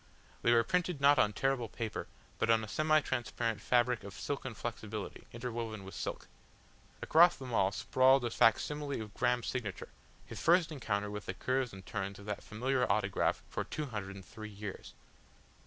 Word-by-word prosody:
They 120 - +3
were 115 -1 +5
printed 180 +2 0
not 140 +1 +6
on 105 - +4
tearable 125 0 0
paper, 115 -1 -4 0.3
but - - +1
on 115 -1 +4
a - - -5
semi 155 +6 +3
transparent 120 -4 -2
fabric 125 -2 +2
of 100 0 -9
silken 130 -4 -4
flexibility, 110 -2 -6
interwoven 115 -3 -4
with 95 - -9
silk. - - -5 0.8
Across 170 +2 +6
them 130 -3 -7
all 95 -3 +3
sprawled 130 +5 +4
a 120 - -1
facsimile 145 +5 +2
of 105 -2 -7
Graham's 125 -1 +1
signature, 110 -7 -4 0.4
his - - -8
first 170 0 +4
encounter 105 -8 -2
with 105 0 -6
the - - -3
curves 130 -1 0
and 95 0 -11
turns 100 -1 -4
of 100 - -12
that 105 -1 -4
familiar 125 +4 0
autograph - - +1
for - - -3
two 155 - -4
hundred 105 -6 -5
and 95 -1 -10
three 110 -1 -9
years. 100 -1 -8
115 Hz, 175 wpm, -33 LUFS, 105-135 Hz, 0.8 s, not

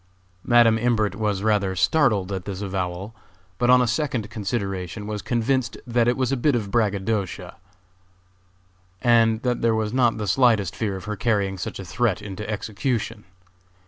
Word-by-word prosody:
Madam 120 -2 +5
Imbert 110 -4 +1
was 105 -1 -2
rather 100 -3 +1
startled 105 - +2
at 95 -2 -4
this 95 -2 -5
avowal, 95 +1 -4 0.5
but 120 0 +2
on 125 0 +6
a - - 0
second 120 -3 -2
consideration 100 -2 -4
was 105 -1 -4
convinced 120 +2 -1
that 120 -1 +1
it 120 - +2
was 130 0 0
a - - +2
bit 140 +2 +2
of 105 -4 -3
braggadocio, 105 -2 -1 1.5
and 115 -1 +3
that 125 -2 0
there 115 -1 +2
was 110 0 -1
not 120 -3 +2
the 105 - -3
slightest 105 -3 +2
fear 105 -4 -2
of 95 - -8
her 105 0 -3
carrying 100 -2 0
such 90 - -5
a 95 - -7
threat 110 +3 0
into 105 0 -7
execution. 110 0 -3
110 Hz, 165 wpm, -23 LUFS, 100-120 Hz, 1.5 s, on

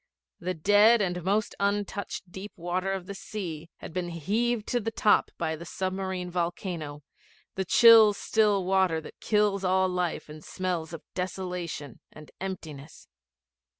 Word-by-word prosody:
The 180 +1 -3
dead 205 +7 +5
and 180 -3 -1
most 205 +4 0
untouched 200 -2 -2
deep 195 +3 -8
water 180 +1 -2
of 190 -2 -3
the 200 - -6
sea 170 -6 -6
had - - -10
been 180 -1 -2
heaved 215 +8 -1
to 245 - +1
the 225 0 -2
top 215 -2 +3
by 160 -1 -1
the 160 - -9
submarine 185 0 -3
volcano 170 -4 -3 0.5
the 190 - -2
chill 225 +2 +8
still 205 -2 +1
water 190 -3 +2
that 160 - -12
kills 210 -2 +1
all 185 0 +3
life 180 -2 -2
and 155 0 -11
smells 175 -4 -3
of 165 -2 -8
desolation 180 -6 -4
and 155 -1 -13
emptiness. 160 -6 -7
185 Hz, 150 wpm, -28 LUFS, 170-200 Hz, 0.5 s, chill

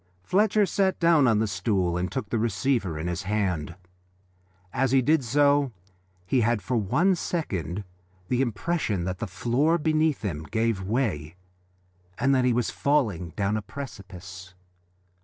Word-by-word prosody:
Fletcher 210 - +3
sat 190 0 0
down 165 -5 +5
on 115 -3 +4
the 110 - +2
stool 95 -2 0
and 90 0 -2
took 105 -1 -4
the 115 - +1
receiver 110 - 0
in 80 - -4
his 85 -1 -2
hand. 95 -6 -1 1.0
As 130 0 +1
he 135 - +6
did 150 +3 +2
so 140 +1 +3 0.5
he 125 +7 +2
had 115 -1 +1
for 125 - -1
one 130 - +2
second 100 - -3 0.4
the 125 +4 +1
impression 120 - -1
that 95 +1 -3
the 110 - -3
floor 125 - +1
underneath 155 -3 +1
him 85 -8 -3
gave 110 +2 0
way 95 - -2 0.8
and 135 0 +2
that 130 -1 +3
he 125 - +3
was 120 0 0
falling 110 - 0
down 100 +1 0
a 110 - -1
precipice. 95 -7 -9
115 Hz, 155 wpm, -26 LUFS, 95-140 Hz, 1.0 s, he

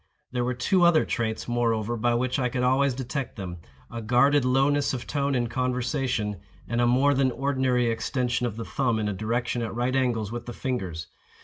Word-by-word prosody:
There 125 -1 -1
were 125 +1 -1
two 180 +8 +2
other 170 -2 +5
traits, 110 -2 -2
moreover, 120 -1 0
by 120 +1 +1
which 130 +3 0
I 125 -1 +1
could 125 +1 -2
always 130 +1 +2
detect 130 0 -4
them: 90 -3 -6 0.3
a 115 - -5
guarded 125 +5 +4
lowness 135 +2 +2
of 125 - -6
tone 140 -1 -1
in 120 -1 +1
conversation, 125 -3 -1 0.3
and 120 +1 0
a 120 - +3
more 135 +4 +4
than 135 -1 +2
ordinary 130 -1 +1
extension 120 +2 -1
of 110 -2 -6
the 115 - -4
thumb 130 -5 0
in 110 -1 -1
a 105 - -1
direction 115 +4 -1
at 115 -1 -4
right 125 +2 0
angles 120 -5 0
with 120 0 -6
the 120 - -5
fingers. 95 -13 -3
125 Hz, 200 wpm, -26 LUFS, 115-130 Hz, 0.3 s, other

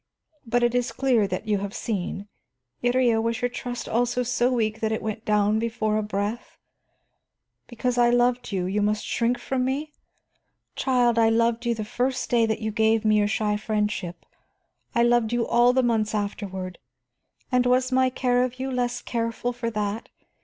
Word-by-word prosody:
But 240 +1 +1
it 240 0 +2
is 245 0 0
clear 250 -6 +2
that 185 +4 -4
you 210 -2 +1
have 200 +1 -5
seen. 200 -2 -3 0.6
Iría, 245 -2 +3
was 230 0 -1
your 245 - +2
trust 245 0 -5
also 245 +2 0
so 245 +1 +1
weak 220 -3 0
that 220 -1 -1
it 220 - -2
went 220 +1 -4
down 210 0 +2
before 220 -2 -1
a - - +1
breath? 210 +3 -4 1.1
Because 245 +1 -2
I 240 0 +5
loved 245 0 +1
you, 190 +2 -1
must 210 +1 0
you - - -3
shrink 240 +1 +1
from 260 0 -2
me? 285 +4 -2 0.8
Child, 245 -3 +2
I 225 0 +5
loved 230 +1 +1
you 235 - +1
the 215 -1 -4
first 250 +4 -2
day 230 -2 +4
that 220 0 -2
you 220 0 -2
gave 220 0 +2
me 215 0 +4
your 205 - +2
shy 210 0 0
friendship, 210 -4 -2 0.7
I 235 - +4
loved 240 -1 +2
you 240 -1 +1
all 240 +1 +4
the 260 0 +2
months 220 -3 +1
afterward, 190 -3 -4 0.7
and 250 -1 +3
was 255 +1 +2
my 260 0 +3
care 250 -1 +1
of 255 0 -4
you 265 +1 -3
less 245 -1 -2
careful 230 +1 -2
for 240 -1 -3
that? 210 0 -3
230 Hz, 180 wpm, -25 LUFS, 215-245 Hz, 1.1 s, I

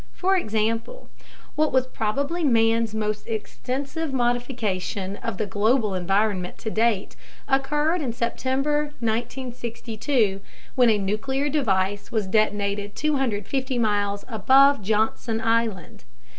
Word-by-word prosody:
For 380 +1 +1
example, 225 - -2 0.4
what 310 0 +1
was 260 -1 +3
probably 280 +9 -2
man's 225 -4 +3
most 215 -1 -2
extensive 270 +7 -4
modification 240 -6 -1
of 230 -4 -4
the 215 - -1
global 215 +1 +1
environment 190 0 0
to 220 - -5
date 220 -3 +1 0.3
occurred 295 +5 +1
in 260 -5 -1
September 265 +5 0
1962, 235 -2 -2 0.3
when 245 -2 +4
a 215 - +4
nuclear 265 +9 -1
device 200 -8 0
was 220 -3 0
detonated 205 0 0
250 265 -2 -1
miles 205 -3 0
above 265 +4 +5
Johnson 220 +2 0
Island. 225 -5 -1
230 Hz, 110 wpm, -24 LUFS, 210-265 Hz, 0.4 s, above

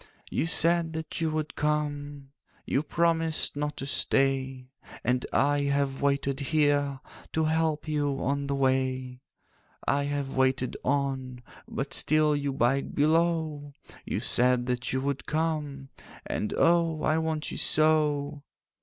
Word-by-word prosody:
'You 165 - 0
said 165 0 +3
that 160 0 -5
you 160 - +1
would 155 -1 -3
come, 145 -2 -2 0.3
You 135 - +1
promised 165 0 0
not 150 +1 -3
to 135 - -4
stay; 135 -2 0 0.3
And 125 +1 0
I 145 0 +2
have 140 -1 0
waited 140 -1 0
here, 145 -1 +1 0.3
To 160 - +1
help 160 0 0
you 145 -3 0
on 140 +1 -1
the 140 - -1
way. 130 -1 0 0.7
'I 140 0 +2
have 145 -1 -3
waited 130 -1 +1
on, 130 -2 -1 0.2
But - - -4
still 155 0 +3
you 145 -1 -1
bide 135 +1 0
below; 155 -1 +1 0.3
You - - -3
said 125 0 +2
that 125 0 -2
you 130 - 0
would 140 0 -3
come, 150 -4 -2 0.4
And 105 - -2
oh, 165 -2 +3
I 155 +1 +2
want 160 -1 -2
you - - -4
so! 150 -2 +2
145 Hz, 135 wpm, -28 LUFS, 135-155 Hz, 0.7 s, said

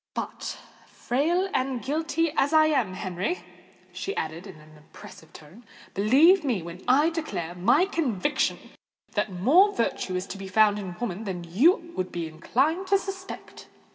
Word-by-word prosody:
But, - - -5 0.3
frail 335 +9 0
and 260 -1 0
guilty 315 +3 -1
as 285 +3 +2
I 310 0 +6
am, 260 -12 +1
Henry," 190 - -3 0.5
she 395 - -4
added 160 +4 -4
in 190 - -10
an 155 0 -17
impressive 155 +1 -14
tone, 165 +10 -15 0.3
"believe 290 - +5
me 235 - -1
when 170 +2 -9
I 290 +6 +4
declare 310 - -4
my 235 - +3
conviction 295 - 0 0.5
that 210 -1 -1
more 300 - +4
virtue 190 -5 -1
is 180 +1 -2
to 195 - -6
be 195 - -7
found 210 +1 +3
in 185 -3 -6
woman 225 -2 -4
than 180 -3 -4
you 330 - +2
would 185 0 -3
be 170 -1 -3
inclined 275 - 0
to 395 - +4
suspect." 385 -1 -8
240 Hz, 160 wpm, -26 LUFS, -, 0.5 s, I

